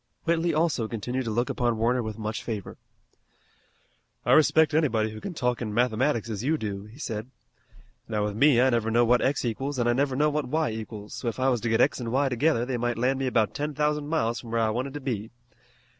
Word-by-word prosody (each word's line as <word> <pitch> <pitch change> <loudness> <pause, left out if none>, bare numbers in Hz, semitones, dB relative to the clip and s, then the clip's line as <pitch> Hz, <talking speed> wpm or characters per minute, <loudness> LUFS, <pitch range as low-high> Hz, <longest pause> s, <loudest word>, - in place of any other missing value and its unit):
Whitley 170 +1 +1
also 155 -7 +1
continued 125 +4 -3
to - - -2
look 120 +3 0
upon 120 -2 0
Warner 120 +3 +1
with 110 -2 -5
much 110 0 -4
favor. 105 -5 -5 1.5
"I - - +2
respect 155 0 +5
anybody 115 -9 +2
who 110 0 -9
can 180 - -6
talk 125 -3 -1
in 105 -3 -3
mathematics 120 +1 +1
as 110 -1 -4
you 155 +4 +1
do," 100 -5 -5
he 110 +4 -14
said. 110 -5 -5 0.8
"Now 105 -2 -1
with 105 -1 -3
me 135 +1 +5
I 130 +1 +4
never 115 -2 +1
know 120 +2 +3
what 120 +1 +4
x 135 -1 0
equals 135 +5 -2
an' 120 -1 +1
I 120 - +4
never 135 +1 0
know 150 +2 +2
what 150 0 -1
y 155 -1 0
equals, 110 -1 -7
so 125 - -5
if 115 +1 -3
I 130 +1 +3
was 120 -4 0
to 120 - -1
get 115 - +3
x 135 - +2
an' 115 - -3
y 135 +3 +2
together 125 -1 +1
they 125 -1 -2
might 120 0 -1
land 130 +3 +1
me 135 - -1
about 115 -4 +1
ten 150 0 -3
thousand 150 0 0
miles 130 -7 0
from 120 - -10
where 115 0 0
I 110 -1 +2
wanted 130 +5 -3
to 145 - -5
be. 110 -5 -3
120 Hz, 235 wpm, -26 LUFS, 110-140 Hz, 1.5 s, respect